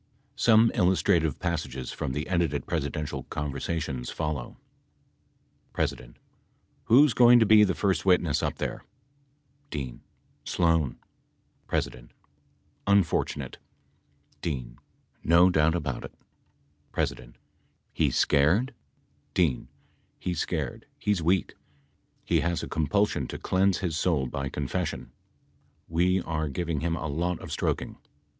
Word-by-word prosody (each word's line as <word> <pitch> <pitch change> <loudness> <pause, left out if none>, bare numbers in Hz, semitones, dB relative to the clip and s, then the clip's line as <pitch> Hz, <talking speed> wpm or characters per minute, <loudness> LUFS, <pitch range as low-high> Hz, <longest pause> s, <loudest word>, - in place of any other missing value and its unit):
Some 115 0 +5
illustrative 90 -4 +2
passages 75 -7 -3
from 65 - -4
the 75 +2 -3
edited 85 -5 0
Presidential 75 -3 -3
conversations 70 -3 -3
follow: 75 -6 -4 1.2
P. - - +3 1.0
Who 125 +6 +7
is 145 - +1
going 120 0 +7
to 115 - +5
be 110 0 +7
the 95 -2 +1
first 95 -5 +1
witness 90 -5 +3
up - - -1
there? - - -4 0.9
D. 65 -5 -5 0.4
Sloan. 80 -6 +1 0.7
P. - - +2 1.1
Unfortunate. 100 -4 +1 0.8
D. 65 -7 -3 0.5
No 85 +3 +5
doubt 80 0 +3
about 85 -5 -3
it - - -10 0.9
— - - -5
P. - - -14 0.6
He's - - +1
scared? 95 - +3 0.6
D. 80 -9 +1 0.5
He's 90 -3 -3
scared, - - -3
he's 105 -4 0
weak. 90 +3 +1 0.7
He - - +2
has 85 0 -1
a - - -4
compulsion 80 -3 0
to - - -6
cleanse 95 0 +2
his 90 -5 -2
soul 80 -4 +1
by 70 +1 -3
confession. 70 -1 -3 0.8
We 90 +3 +2
are 80 -2 -2
giving 80 +2 -2
him 85 +1 -1
a 80 - -5
lot 85 +4 -1
of - - -9
stroking. - - -2
85 Hz, 120 wpm, -27 LUFS, 75-95 Hz, 1.2 s, Who